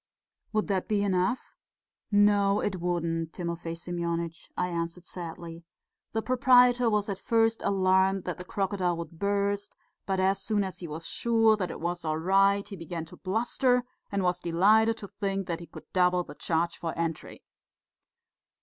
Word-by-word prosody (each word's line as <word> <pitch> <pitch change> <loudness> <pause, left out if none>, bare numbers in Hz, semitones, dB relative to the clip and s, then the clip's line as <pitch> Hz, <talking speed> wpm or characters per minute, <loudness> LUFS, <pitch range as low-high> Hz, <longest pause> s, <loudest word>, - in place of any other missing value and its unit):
"Would 215 -1 +1
that 195 -3 -1
be 205 -1 +1
enough?" 190 +4 0 0.6
"No, 205 -1 +4
it 190 -2 -1
wouldn't, 165 -2 -1
Timofey 170 -2 -4
Semyonitch," 170 -1 -4
I 180 - +1
answered 170 0 -3
sadly. 170 -1 -7 0.5
"The 220 0 -1
proprietor 250 -1 +5
was 210 -2 +1
at 195 -2 -3
first 225 +1 +2
alarmed 190 0 +2
that 180 -2 -4
the - - -5
crocodile 185 -2 -1
would 170 -1 -8
burst, 200 0 -1 0.3
but 190 -1 0
as 190 +1 +2
soon 210 -2 0
as 190 -1 -5
he 175 - -6
was 160 +2 -7
sure 225 -2 +3
that 185 -4 -3
it - - -6
was 175 +1 -3
all 155 -1 -1
right, 195 +4 +3
he 205 - -7
began 165 -1 -6
to 165 - -13
bluster 245 +5 +1 0.3
and 200 -1 0
was 180 0 +1
delighted 215 +7 +3
to 200 - -8
think 195 -1 -3
that 170 -2 -3
he 170 - -10
could 155 -2 -12
double 180 -1 +3
the - - -10
charge 170 +1 -1
for 165 -1 -4
entry." 165 -1 -4
185 Hz, 170 wpm, -28 LUFS, 170-205 Hz, 0.6 s, proprietor